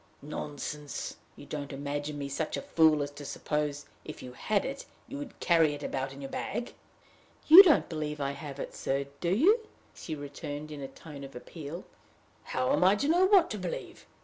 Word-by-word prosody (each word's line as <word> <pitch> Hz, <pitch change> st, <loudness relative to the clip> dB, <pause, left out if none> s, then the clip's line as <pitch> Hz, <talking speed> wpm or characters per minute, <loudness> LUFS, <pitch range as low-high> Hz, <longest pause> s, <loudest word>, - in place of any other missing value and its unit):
"Nonsense! 145 Hz, 0 st, -5 dB, 0.2 s
You -, -, -12 dB
don't 145 Hz, -2 st, -5 dB
imagine 145 Hz, +1 st, -4 dB
me 140 Hz, -1 st, -3 dB
such 145 Hz, +3 st, -2 dB
a -, -, -5 dB
fool 155 Hz, -3 st, +4 dB
as 145 Hz, -, -5 dB
to 145 Hz, 0 st, -10 dB
suppose, 145 Hz, 0 st, -2 dB, 0.2 s
if 155 Hz, -, -8 dB
you 125 Hz, -, -7 dB
had 205 Hz, +9 st, 0 dB
it, 275 Hz, +1 st, -5 dB, 0.2 s
you 280 Hz, -, -6 dB
would 285 Hz, -3 st, -8 dB
carry 165 Hz, -4 st, +4 dB
it 145 Hz, -, -9 dB
about 135 Hz, 0 st, -2 dB
in 135 Hz, +1 st, -10 dB
your 135 Hz, -, -6 dB
bag!" 240 Hz, -, -3 dB, 0.7 s
"You 330 Hz, +5 st, +13 dB
don't 340 Hz, -7 st, +4 dB
believe 150 Hz, -2 st, -4 dB
I 140 Hz, -1 st, -1 dB
have 140 Hz, 0 st, -8 dB
it, -, -, -5 dB
sir 135 Hz, +1 st, -1 dB
do 170 Hz, -, -1 dB
you?" 400 Hz, -, +4 dB, 0.3 s
she 160 Hz, -, -6 dB
returned, 145 Hz, +1 st, -6 dB
in 145 Hz, -2 st, -7 dB
a 135 Hz, -, -4 dB
tone 145 Hz, 0 st, -11 dB
of 135 Hz, -1 st, -10 dB
appeal. 155 Hz, +6 st, -7 dB, 0.6 s
"How 130 Hz, 0 st, 0 dB
am 150 Hz, -, +3 dB
I 190 Hz, +2 st, +6 dB
to 280 Hz, +7 st, -1 dB
know 350 Hz, +4 st, +5 dB
what 385 Hz, -4 st, +5 dB
to 210 Hz, -, -3 dB
believe? 180 Hz, -2 st, -6 dB
150 Hz, 200 wpm, -30 LUFS, 140-185 Hz, 0.7 s, You